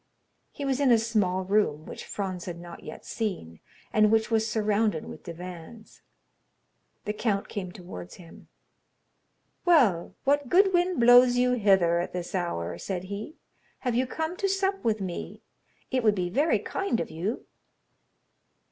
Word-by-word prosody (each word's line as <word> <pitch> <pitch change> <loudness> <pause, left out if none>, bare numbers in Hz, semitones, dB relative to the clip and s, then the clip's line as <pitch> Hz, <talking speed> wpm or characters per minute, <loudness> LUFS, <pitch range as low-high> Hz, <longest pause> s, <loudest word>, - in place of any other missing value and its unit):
He 285 - -6
was 270 -1 0
in 280 -2 +3
a 235 - +7
small 210 -5 0
room 185 -6 +1
which - - -8
Franz 185 -3 -4
had 170 -2 -6
not 170 -1 -10
yet 155 - -10
seen, 180 - -4 0.3
and 215 0 +4
which 225 +1 +2
was 220 0 +2
surrounded 210 -5 +1
with - - -9
divans. 180 +5 -10 1.0
The 210 - -1
count 210 -2 -1
came 185 -3 -5
towards 130 - -9
him. 170 -3 -15 1.2
"Well, 250 - +3
what 285 -1 +1
good 385 +4 +5
wind 355 -1 +2
blows 245 +1 +7
you 250 0 +3
hither 190 -7 +3
at 175 - -4
this 175 -1 -5
hour?" 90 - -2
said 185 - -4
he; 215 +11 -6 0.5
"have 250 -3 -1
you 250 +2 +1
come 320 +6 -3
to 395 - 0
sup 390 0 0
with 220 -2 0
me? 180 -3 -6 0.5
It 255 -2 +1
would 215 -2 +4
be 180 -2 -2
very 290 - +3
kind 390 -12 -2
of - - -4
you." 185 +9 -3
215 Hz, 155 wpm, -27 LUFS, 180-250 Hz, 1.2 s, a